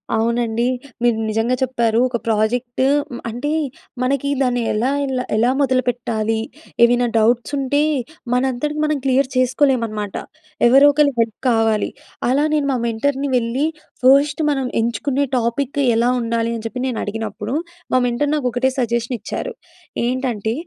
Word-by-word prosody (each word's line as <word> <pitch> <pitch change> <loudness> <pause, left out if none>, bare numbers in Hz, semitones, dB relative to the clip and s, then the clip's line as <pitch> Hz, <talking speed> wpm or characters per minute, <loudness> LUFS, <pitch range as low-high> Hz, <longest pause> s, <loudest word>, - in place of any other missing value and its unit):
అవునండి. 235 +1 0 0.4
మీరు 240 -2 +3
నిజంగా 225 +3 +1
చెప్పారు. 235 -3 +1
ఒక 240 - -1
ప్రాజెక్ట్ 240 +3 0 0.3
మ్ - - -6
అంటే 245 +6 -3 0.5
మనకి 275 +2 0
దాన్ని 245 -2 +1
ఎలా 235 +5 +1
ఎలా, 260 -2 -2
ఎలా 235 +3 +3
మొదలుపెట్టాలీ, 240 -4 0 0.4
ఏవైనా 245 +1 +4
డౌట్స్ 235 +5 +2
ఉంటే, 275 +2 +1 0.5
మనంతట 260 +3 0
మనం 305 -1 +1
క్లియర్ 265 0 +2
చేసుకోలేం 255 0 +2
అనమాట. 210 -2 -5 0.5
ఎవరో 270 +4 +7
ఒకళ్ళ 290 -1 +3
హెల్ప్ 225 -2 0
కావాలి. 225 -2 +2 0.4
అలా 275 +3 +2
నేను 300 -2 +1
మా 255 - 0
మెంటర్‌ని 275 +5 -1
వెళ్ళి 240 +5 0 0.4
ఫస్ట్ 280 +4 +4
మనం 270 -2 0
ఎంచుకునే 245 +5 0
టాపిక్ 245 +4 -1 0.2
ఎలా 235 +2 +3
ఉండాలి 230 -1 -1
అని 225 - -6
చెప్పి 250 +3 -6
నేను 245 - -3
అడిగినప్పుడు, 215 +1 -4 0.4
మా 255 - +5
మెంటర్ 245 +4 0
నాకు 270 -4 -1
ఒకటే 245 +2 +1
సజెషన్ 235 0 -1
ఇచ్చారు. - - -5 0.5
ఏంటంటే, 240 -4 -1
245 Hz, 140 wpm, -20 LUFS, 230-265 Hz, 0.5 s, ఎవరో